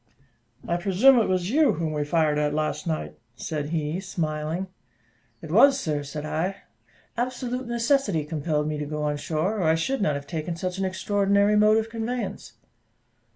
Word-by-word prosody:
"I 170 - +1
presume 205 +8 +5
it 220 - +1
was 185 +1 0
you 305 +2 +4
whom 160 -1 -2
we 150 -1 -1
fired 150 -1 +1
at 150 0 0
last 155 0 -2
night?" 75 - -3 0.2
said 150 +2 -4
he, 160 +1 -2
smiling. 160 -1 -3 0.8
"It - - -7
was, 275 -1 +6
sir," 150 - -1
said 145 +1 -6
I; 175 +5 -2 0.5
"absolute 250 +1 -3
necessity 235 - +1
compelled 150 -1 -1
me 155 -1 -2
to 150 - -3
go 150 0 -3
on 150 0 0
shore, 165 +8 -1
or - - 0
I 160 0 +4
should 240 +10 -1
not 150 -7 +1
have 140 0 -5
taken 160 +3 -4
such 180 +2 -4
an 195 - 0
extraordinary 200 +2 +2
mode 210 +1 +5
of 225 0 -2
conveyance." 225 - -4
170 Hz, 175 wpm, -25 LUFS, 150-210 Hz, 0.8 s, was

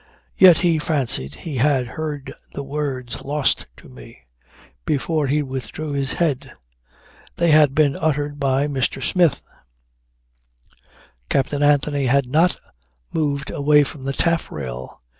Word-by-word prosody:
Yet 180 -4 +7
he 165 -2 +3
fancied 135 - +1
he 150 -5 -6
had 130 0 +2
heard 150 -3 -5 0.2
the 140 - -5
words 135 -3 -4
"Lost 145 0 0
to - - -15
me" 65 -2 -14 0.6
before 150 - -1
he 145 +2 +1
withdrew 135 +3 -6
his 140 -1 -1
head. 140 -6 -1 0.8
They 170 -1 +2
had 150 -3 +5
been 145 -3 +3
uttered 145 -2 -1
by 135 0 +1
Mr. 135 -1 -2
Smith. 175 -5 +2 1.9
Captain 140 +2 0
Anthony 145 -1 +2
had 140 +2 +3
not 160 +8 +2 0.6
moved 145 -3 -1
away 150 +1 +4
from 145 0 -7
the 135 - -2
taffrail. 70 - -3
145 Hz, 125 wpm, -21 LUFS, 135-150 Hz, 1.9 s, Yet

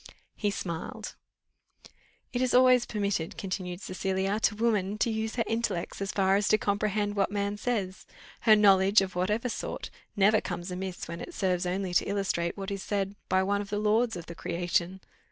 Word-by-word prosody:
He 210 - 0
smiled. 170 -5 -5 1.2
"It 245 - 0
is 255 -1 +2
always 255 -1 +6
permitted," 200 -6 -2
continued 185 -1 -4
Cecilia, 190 +2 -1
"to 220 - +2
woman 210 -3 +1
to 230 - +1
use 220 0 -2
her 235 - +1
intellects 225 -6 -2
so 195 - -2
far 195 0 +2
as 205 - 0
to 215 - +5
comprehend 205 0 0
what 200 -1 +2
man 200 0 -1
says; 205 -4 -3 0.3
her 220 -2 +6
knowledge, 195 -1 +5
of 190 -1 -3
whatever 210 +7 0
sort, 235 - -5 0.2
never 210 +1 +4
comes 175 0 -5
amiss 185 0 -5
when 170 0 -6
it 350 - -8
serves 180 -2 0
only 185 0 -2
to - - +3
illustrate 195 -4 -1
what 195 0 -5
is 195 -1 -3
said 200 -1 -2 0.2
by 190 0 +3
one 200 +1 +1
of 200 - -8
the 205 - -1
lords 220 +2 +2
of 170 -2 -7
the 170 - -8
creation. 175 +2 -1
200 Hz, 185 wpm, -29 LUFS, 185-215 Hz, 1.2 s, always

